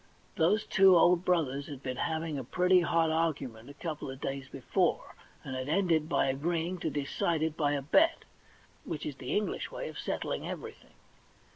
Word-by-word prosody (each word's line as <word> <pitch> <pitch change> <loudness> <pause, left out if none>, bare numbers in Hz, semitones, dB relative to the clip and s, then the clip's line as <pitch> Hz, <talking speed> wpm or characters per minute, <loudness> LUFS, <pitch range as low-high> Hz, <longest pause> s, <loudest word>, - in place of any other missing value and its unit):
Those 200 +4 +2
two 190 -2 +6
old 175 +1 +5
brothers 145 -6 0
had 140 -2 -9
been 130 -1 -4
having 160 -1 -2
a - - -5
pretty 180 +8 +3
hot 165 -2 +2
argument 140 -8 -2
a 145 - -11
couple 155 -3 -5
of 135 0 -7
days 135 -1 -4
before, 135 - -1 0.3
and 130 - -5
had 130 +2 -4
ended 165 -3 +2
by - - +2
agreeing 165 +6 -1
to 160 - -1
decide 150 +3 -1
it 160 -1 -1
by 145 -2 +1
a 140 -2 -2
bet, 315 - +3 0.6
which 155 -2 -5
is 145 -3 -5
the 130 +6 -2
EngUsh 210 - -4
way - - -5
of - - -8
settling - - -3
every - - -5
thing. - - -23
160 Hz, 185 wpm, -30 LUFS, 140-175 Hz, 0.6 s, two